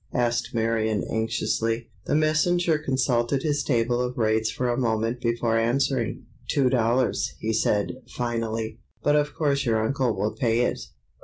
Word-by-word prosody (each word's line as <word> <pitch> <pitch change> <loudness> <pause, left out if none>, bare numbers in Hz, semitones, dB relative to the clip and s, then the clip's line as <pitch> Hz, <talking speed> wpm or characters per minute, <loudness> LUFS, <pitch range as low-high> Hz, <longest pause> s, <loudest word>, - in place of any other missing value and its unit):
asked 120 -1 0
Marion, 110 -2 0
anxiously. 115 +1 -1 0.2
The - - +1
messenger 155 +2 +2
consulted 130 -2 0
his 145 -2 0
table 120 -1 +1
of 125 0 -3
rates 110 -1 +2
for 125 - -2
a 120 - +1
moment 115 0 0
before 115 -1 +1
answering. 125 +1 0 0.2
"Two 135 -3 +2
dollars," 120 0 +1
he 110 +1 -2
said, 105 +2 +1
finally; 115 -2 -3 0.2
"but 145 - +3
of 150 0 +1
course 140 -3 +1
your 115 -3 +1
uncle 130 -2 0
will 105 +3 -1
pay 120 -3 +1
it. 125 - 0
120 Hz, 150 wpm, -25 LUFS, 115-135 Hz, 0.2 s, but